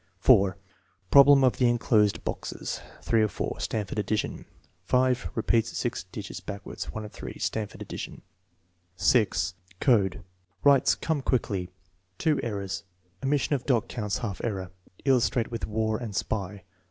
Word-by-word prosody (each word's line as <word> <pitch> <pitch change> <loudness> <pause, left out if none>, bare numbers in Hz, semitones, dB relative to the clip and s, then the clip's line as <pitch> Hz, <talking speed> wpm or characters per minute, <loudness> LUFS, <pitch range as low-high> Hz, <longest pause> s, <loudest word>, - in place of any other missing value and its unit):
4. 95 -1 +5 0.5
Problem 140 0 +8
of 130 - +3
the 125 -2 +4
enclosed 110 -3 +2
boxes. - - -4 0.2
(3 115 - +3
of 110 - +2
4.) - - -3
(Stanford 105 -1 -2
addition.) 105 +1 -2 0.4
5. 130 0 +2
Repeats 115 0 +1
G - - +1 0.2
digits - - -6
backwards. 100 0 -6
(1 110 -1 -5
of 105 - -9
3.) - - -8
(Stanford 105 -2 -3
addition.) - - -7 0.7
0. 115 -5 +4 0.5
Code, 100 -8 +2 0.4
writes 140 -2 +5
"Come 160 -3 -1
quickly." 100 -9 -1 0.5
(2 155 -2 +2
errors. 100 -3 -3 0.4
Omission 145 +2 +1
of 135 - -2
dot 120 -5 +2
counts 105 -4 -2
half 105 -6 -5
error. 95 -5 -3 0.3
Illustrate 125 -3 +2
with 115 - -3
"war" 110 0 0
and 115 -5 -6
spy.") 100 -2 -3
110 Hz, 140 wpm, -27 LUFS, 100-125 Hz, 0.7 s, Problem